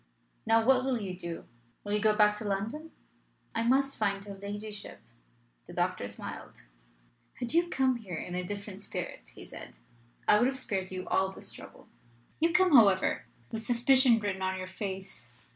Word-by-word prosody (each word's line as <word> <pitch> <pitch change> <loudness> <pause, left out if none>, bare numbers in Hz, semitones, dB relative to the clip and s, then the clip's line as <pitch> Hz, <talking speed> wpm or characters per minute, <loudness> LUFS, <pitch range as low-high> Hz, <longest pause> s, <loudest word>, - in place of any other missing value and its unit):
Now 225 0 +4
what 255 0 +5
will 260 -3 0
you 190 -4 -4
do? 170 -2 -6 0.4
Will 205 - -3
you 210 - +3
go 215 0 +4
back 210 -1 +5
to - - -5
London?" 215 +11 -3 0.6
"I 230 - 0
must 275 +4 +2
find 200 -2 0
her 200 - -7
ladyship." 205 +1 -7 0.7
The - - -10
doctor - - -1
smiled. - - -8 0.7
"Had 245 +1 -1
you 340 +1 +3
come 260 -4 +2
here 195 -7 -7
in 175 - -5
a 180 0 -2
different 200 +1 -6
spirit," - - -6
he - - -10
said, - - -10 0.5
"I 210 - +6
would 240 - +4
have 265 0 -1
spared 195 -7 -2
you 185 -1 -5
all 190 0 +2
this - - -8
trouble. - - -12 0.5
You 330 +2 +3
come, 360 -2 +5
however, 200 -6 +5 0.3
with 225 - -3
suspicion 245 0 +5
written 200 -3 -2
on 190 0 -1
your 185 - -4
face. 190 - -6
210 Hz, 175 wpm, -30 LUFS, 190-250 Hz, 0.7 s, I